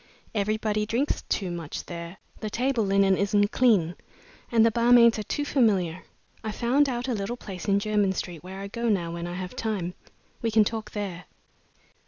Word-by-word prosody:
Everybody 215 Hz, 0 st, 0 dB
drinks 255 Hz, +7 st, 0 dB
too 190 Hz, -4 st, -1 dB
much 165 Hz, -3 st, -5 dB
there. 170 Hz, +1 st, -7 dB, 0.2 s
The 215 Hz, -, -4 dB
table 250 Hz, +1 st, 0 dB
linen 195 Hz, -1 st, +3 dB
isn't 205 Hz, +1 st, +2 dB
clean, 205 Hz, -10 st, +3 dB, 0.6 s
and 225 Hz, -1 st, +5 dB
the 230 Hz, -, +4 dB
barmaids 235 Hz, 0 st, +5 dB
are 210 Hz, -, -6 dB
too 290 Hz, -, -1 dB
familiar. 190 Hz, -, +2 dB, 0.4 s
I've 215 Hz, -1 st, -4 dB
found 270 Hz, +4 st, +2 dB
out 245 Hz, 0 st, -3 dB
a 255 Hz, -, 0 dB
little 210 Hz, +3 st, -3 dB
place 190 Hz, -6 st, -8 dB
in 200 Hz, -1 st, +4 dB
Jermyn 205 Hz, -2 st, +1 dB
Street 175 Hz, -3 st, -5 dB
where 190 Hz, +2 st, -8 dB
I 200 Hz, -, -5 dB
go 235 Hz, +3 st, -2 dB
now 175 Hz, -5 st, 0 dB
when 170 Hz, 0 st, -4 dB
I 175 Hz, -, -5 dB
have 185 Hz, +5 st, -6 dB
time. 205 Hz, -7 st, -2 dB, 0.5 s
We 230 Hz, -, 0 dB
can 220 Hz, -1 st, +5 dB
talk 220 Hz, +1 st, -3 dB
there." 195 Hz, -4 st, -5 dB
210 Hz, 185 wpm, -26 LUFS, 185-230 Hz, 0.6 s, and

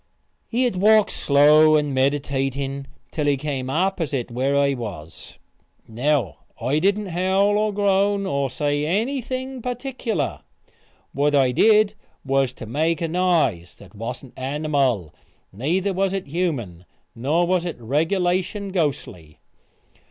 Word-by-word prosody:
He 245 Hz, +2 st, 0 dB
had 240 Hz, -7 st, 0 dB
walked 215 Hz, +2 st, +4 dB
slow 150 Hz, +2 st, +5 dB
and 150 Hz, -2 st, +1 dB
meditating 135 Hz, 0 st, -1 dB, 0.2 s
till 150 Hz, -2 st, -2 dB
he 140 Hz, -1 st, +2 dB
come 135 Hz, -2 st, -4 dB
opposite 160 Hz, -6 st, -1 dB
where 135 Hz, +4 st, 0 dB
I 140 Hz, 0 st, +3 dB
was. 100 Hz, -, -8 dB, 0.5 s
Now 125 Hz, -, 0 dB, 0.2 s
I 130 Hz, +6 st, 0 dB
didn't 200 Hz, +3 st, +1 dB
howl 190 Hz, +4 st, +2 dB
or 210 Hz, 0 st, +1 dB
groan 200 Hz, 0 st, +1 dB
or 140 Hz, -5 st, -1 dB
say 145 Hz, +1 st, -1 dB
anything 255 Hz, -, -2 dB
particular. 245 Hz, -, -3 dB, 0.7 s
What 145 Hz, +1 st, +1 dB
I 135 Hz, -3 st, +4 dB
did 215 Hz, -, +4 dB, 0.3 s
was 135 Hz, -1 st, +1 dB
to 120 Hz, -, -9 dB
make 155 Hz, +7 st, 0 dB
a 165 Hz, -, -1 dB
noise 160 Hz, -, 0 dB
that 95 Hz, -3 st, -16 dB
wasn't 120 Hz, +4 st, -7 dB
animal, 135 Hz, -, -1 dB, 0.4 s
neither 175 Hz, -, -1 dB
was 190 Hz, +1 st, 0 dB
it 195 Hz, -1 st, -3 dB
human, 135 Hz, -, -3 dB, 0.3 s
nor 150 Hz, +9 st, +1 dB
was 180 Hz, 0 st, +1 dB
it 175 Hz, -7 st, -5 dB
regulation 180 Hz, -, 0 dB
ghostly. 120 Hz, -, -3 dB
150 Hz, 130 wpm, -22 LUFS, 135-190 Hz, 0.7 s, slow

